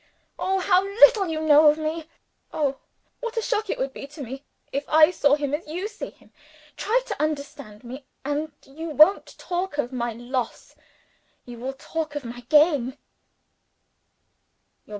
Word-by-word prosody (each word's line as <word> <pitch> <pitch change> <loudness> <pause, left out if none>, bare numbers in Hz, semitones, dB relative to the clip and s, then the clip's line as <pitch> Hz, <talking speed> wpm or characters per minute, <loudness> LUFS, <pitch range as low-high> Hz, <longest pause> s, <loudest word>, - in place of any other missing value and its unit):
Oh, 385 +1 0
how 370 0 +3
little 400 0 +5
you 320 -1 -2
know 305 0 +6
of 300 +1 +5
me! 315 +1 -4 0.4
Oh, 275 -3 -1 0.4
what 470 -1 -5
a - - +2
shock 435 -3 -1
it - - -1
would 265 0 -2
be 275 - -8
to 285 0 -9
me, 265 +3 -8 0.3
if 280 +2 -2
I 310 +1 +6
saw 285 -5 +3
him 290 -1 -3
as 300 +2 -3
you 355 +6 -3
see 430 -1 -7
him! - - -23 0.4
Try - - +1
to - - -4
understand 280 -8 -4
me, 260 +3 -9 0.2
and 295 +2 -2
you 320 +5 -7
won't 310 +6 +4
talk 355 -3 -3
of 265 -3 -2
my 240 -2 -2
loss 240 +2 -4 0.7
you 240 -1 -10
will 260 +3 -4
talk 305 +2 -5
of 290 -3 -4
my 235 +1 -7
gain." 295 -4 +4
300 Hz, 165 wpm, -24 LUFS, 270-345 Hz, 0.7 s, know